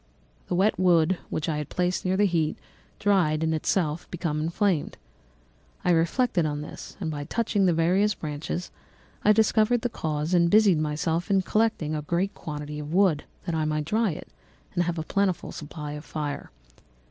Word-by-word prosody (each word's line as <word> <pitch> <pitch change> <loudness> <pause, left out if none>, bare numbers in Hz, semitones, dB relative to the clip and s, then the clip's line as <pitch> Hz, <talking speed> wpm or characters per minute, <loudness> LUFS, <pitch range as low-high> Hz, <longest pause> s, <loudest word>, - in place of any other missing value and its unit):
The - - -1
wet 195 +3 +2
wood 175 -1 +4
which 155 - -2
I 155 -2 0
had 150 - -5
placed 180 0 0
near 185 +1 +1
the 205 - +4
heat 165 -5 +1 0.4
dried 170 -6 +2
and 160 0 +1
itself 160 0 0
became 160 -4 -2
inflamed. 170 +1 0 0.9
I 180 - +4
reflected 175 +4 +2
on 150 -1 -2
this, 150 - -9
and 165 -5 -2
by 145 -1 -4
touching 205 0 +1
the 175 - +4
various 185 +6 +2
branches, 155 +3 -4 0.5
I 210 - +6
discovered 220 +2 +3
the 245 - -1
cause 155 -5 -2
and 170 -1 +4
busied 205 -4 +5
myself 160 +3 -1
in 195 -2 +3
collecting 215 -8 +1
a 155 - -1
great 175 +6 -1
quantity 150 -1 -6
of 150 0 -6
wood, 180 -5 +3 0.2
that 170 - -2
I 160 -1 0
might 155 0 -1
dry 220 +6 +1
it - - -9 0.5
and 175 -1 +1
have 175 0 -2
a 160 - -2
plentiful 190 +1 0
supply 150 0 -7
of 150 0 -7
fire. 150 -3 -4
170 Hz, 180 wpm, -26 LUFS, 155-195 Hz, 0.9 s, I